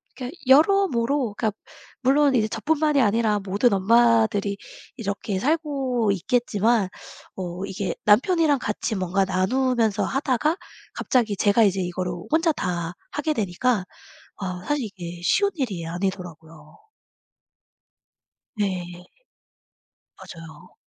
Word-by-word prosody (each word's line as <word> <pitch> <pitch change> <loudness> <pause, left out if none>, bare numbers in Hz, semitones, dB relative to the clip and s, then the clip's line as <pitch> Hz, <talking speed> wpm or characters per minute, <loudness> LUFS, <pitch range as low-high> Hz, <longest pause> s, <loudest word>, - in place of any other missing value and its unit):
그러니까 260 +6 -7
여러모로 280 - +3
그러니까 220 -2 0 0.5
물론 275 +1 +4
이제 220 -3 +2
저뿐만이 300 +2 +1
아니라 215 -1 +2
모든 200 +4 +1
엄마들이 220 0 +3 0.4
이렇게 200 -4 -3
살고 270 - 0
있겠지만 220 0 +1 0.5
어 180 0 -5
이게 195 0 -3
남편이랑 290 - +4
같이 210 +1 -3
뭔가 190 +1 0
나누면서 220 +3 +1
하다가 280 +4 0 0.4
갑자기 230 -5 0
제가 205 +3 +3
이제 195 -2 +2
이거를 180 0 -3 0.2
혼자 325 +1 +3
다 175 - -3 0.2
하게 305 +1 -1
되니까 210 0 0 0.5
아 180 -2 -5
사실 295 -4 0
이게 175 -4 -8
쉬운 400 - +2
일이 205 - -3
아니더라고요. 165 -4 -6 1.7
네. 180 -3 -3 1.1
맞아요. 165 -2 -12
215 Hz, 265 characters per minute, -24 LUFS, 185-260 Hz, 1.7 s, 물론